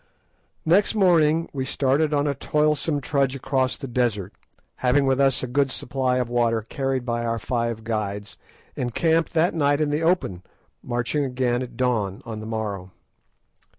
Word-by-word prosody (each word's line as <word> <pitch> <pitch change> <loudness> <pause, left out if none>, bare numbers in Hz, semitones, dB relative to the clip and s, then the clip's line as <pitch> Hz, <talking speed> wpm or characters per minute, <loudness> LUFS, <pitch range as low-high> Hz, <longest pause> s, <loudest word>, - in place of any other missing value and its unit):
Next 195 +7 +3
morning 165 -5 +4
we 135 -2 -2
started 140 +3 +1
on 145 -1 +1
a 145 - +1
toilsome 150 +1 0
trudge 140 -1 0
across 130 -1 0
the 135 - -6
desert, 115 -6 -1 0.4
having 130 +2 +2
with 135 0 +2
us 135 -2 +3
a - - -2
good 135 +2 +1
supply 130 -1 -1
of 125 -2 0
water 115 -2 +1
carried 135 +2 -2
by 120 -1 -1
our 115 0 -1
five 115 -1 -2
guides, 105 -3 -3 0.4
and 120 -2 -3
camped 165 -1 +2
that 165 +2 +3
night 145 -3 +2
in 150 -1 +1
the 150 +2 0
open, 165 - +1 0.4
marching 120 +4 -1
again 125 -2 0
at 120 -2 -7
dawn 110 -7 0
on 110 -2 -6
the 110 - -7
morrow. 105 -4 -4
130 Hz, 165 wpm, -24 LUFS, 115-145 Hz, 0.4 s, morning